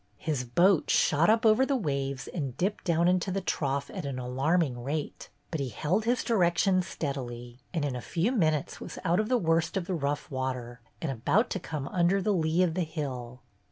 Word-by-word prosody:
His 145 Hz, -2 st, -2 dB
boat 175 Hz, +8 st, +3 dB
shot 160 Hz, +5 st, +4 dB
up 225 Hz, +2 st, +3 dB
over 220 Hz, +4 st, +6 dB
the 275 Hz, +1 st, +1 dB
waves 140 Hz, -, -2 dB
and 140 Hz, -7 st, -4 dB
dipped 200 Hz, +4 st, -1 dB
down 170 Hz, -1 st, +3 dB
into 180 Hz, +1 st, +2 dB
the 195 Hz, -, 0 dB
trough 140 Hz, -6 st, -2 dB
at -, -, -4 dB
an 140 Hz, -2 st, -4 dB
alarming 130 Hz, +2 st, 0 dB
rate, 145 Hz, +3 st, -4 dB, 0.2 s
but 160 Hz, -, -2 dB
he 135 Hz, -2 st, -2 dB
held 170 Hz, -, -1 dB
his 245 Hz, +2 st, +1 dB
direction 185 Hz, -3 st, +3 dB
steadily, 125 Hz, -7 st, -5 dB
and 160 Hz, -4 st, -1 dB
in 135 Hz, -3 st, -2 dB
a 125 Hz, -, -4 dB
few 175 Hz, -, 0 dB
minutes 155 Hz, -, 0 dB
was -, -, -7 dB
out 175 Hz, 0 st, +2 dB
of 215 Hz, +1 st, 0 dB
the 255 Hz, -, +4 dB
worst 165 Hz, -2 st, +1 dB
of 185 Hz, -, -2 dB
the 185 Hz, -, -3 dB
rough 145 Hz, -3 st, -2 dB
water 130 Hz, -2 st, -4 dB, 0.2 s
and 155 Hz, -, 0 dB
about 135 Hz, -, +1 dB
to 190 Hz, -, -1 dB
come 150 Hz, -5 st, -5 dB
under 180 Hz, +2 st, +2 dB
the 205 Hz, +2 st, +1 dB
lee 165 Hz, 0 st, +2 dB
of 170 Hz, -3 st, +1 dB
the 185 Hz, -, -1 dB
hill. 130 Hz, -7 st, -5 dB
160 Hz, 205 wpm, -29 LUFS, 135-185 Hz, 0.2 s, over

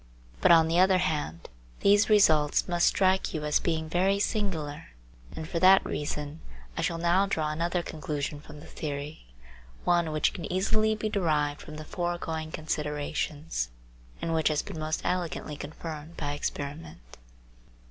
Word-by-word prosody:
But, -, -, +6 dB
on 165 Hz, -1 st, +7 dB
the 165 Hz, +2 st, +2 dB
other 190 Hz, 0 st, +5 dB
hand, 150 Hz, -, -2 dB, 0.3 s
these 205 Hz, +2 st, +5 dB
results 155 Hz, -8 st, +4 dB
must 175 Hz, -1 st, +3 dB
strike 190 Hz, -2 st, +2 dB
you 150 Hz, -1 st, -3 dB
as 150 Hz, -, +3 dB
being 160 Hz, -2 st, -1 dB
very 185 Hz, +4 st, +2 dB
singular, 165 Hz, -8 st, -2 dB, 0.5 s
and 160 Hz, -, -5 dB
for 170 Hz, -, -2 dB
that 190 Hz, +2 st, +7 dB
reason 150 Hz, +1 st, -4 dB, 0.4 s
I -, -, -2 dB
shall 170 Hz, -, 0 dB
now 175 Hz, +4 st, +3 dB
draw 155 Hz, -5 st, 0 dB
another 170 Hz, +3 st, -1 dB
conclusion 150 Hz, -2 st, -4 dB
from 150 Hz, -1 st, -12 dB
the -, -, -12 dB
theory, 145 Hz, -, -6 dB, 0.6 s
one 170 Hz, -2 st, +2 dB
which 155 Hz, 0 st, +1 dB
can 170 Hz, -, -6 dB
easily 215 Hz, +4 st, +2 dB
be 215 Hz, 0 st, -2 dB
derived 150 Hz, -7 st, 0 dB
from 155 Hz, -, -9 dB
the 155 Hz, 0 st, -7 dB
foregoing 165 Hz, -2 st, -3 dB
considerations, 150 Hz, -, -2 dB, 0.5 s
and 165 Hz, -, -1 dB
which 160 Hz, -1 st, +2 dB
has 155 Hz, -1 st, +1 dB
been 160 Hz, -, -7 dB
most 155 Hz, +1 st, -2 dB
elegantly 175 Hz, -4 st, -2 dB
confirmed 155 Hz, +2 st, -7 dB
by 145 Hz, -1 st, -2 dB
experiment. 145 Hz, -, -6 dB
160 Hz, 155 wpm, -28 LUFS, 150-180 Hz, 0.6 s, on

